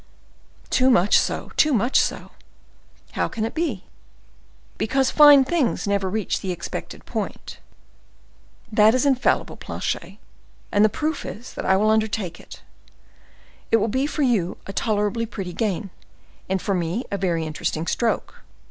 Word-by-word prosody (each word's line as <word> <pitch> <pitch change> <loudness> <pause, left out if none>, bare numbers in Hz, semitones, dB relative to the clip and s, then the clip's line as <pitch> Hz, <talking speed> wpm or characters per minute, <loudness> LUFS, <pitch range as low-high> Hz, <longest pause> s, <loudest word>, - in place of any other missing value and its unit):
"Too 260 0 +4
much 200 -5 +5
so—too 305 -3 0
much 240 +4 +3
so." - - -3 0.8
"How - - -1
can 220 - -4
that 225 - -2
be?" 305 - -2 1.0
"Because 265 +3 +1
fine 290 -3 +8
things 280 -7 0
never 200 -2 0
reach 215 0 -2
the 190 - -3
expected 175 - -7
point." - - -5 1.1
"This 215 +2 +5
is 255 - +1
infallible, 265 -3 +1
Planchet, - - -5 0.5
and 205 - +4
the 215 - +5
proof 305 +7 -3
is 220 +7 -8
that - - -5
I 190 0 +4
undertake 215 -4 0
it. - - -13 1.1
It 225 - +4
will 215 0 0
be 260 +6 0
for 300 0 -1
you 210 -9 +1
a 195 - -7
tolerably 215 +2 0
pretty 190 -5 -6
gain, 200 -2 -2 0.6
and 190 0 +1
for 200 - -2
me 180 +6 -1
a 200 - -1
very 170 -4 0
interesting 155 +1 -3
stroke. 230 +6 -1
215 Hz, 145 wpm, -23 LUFS, 190-255 Hz, 1.1 s, fine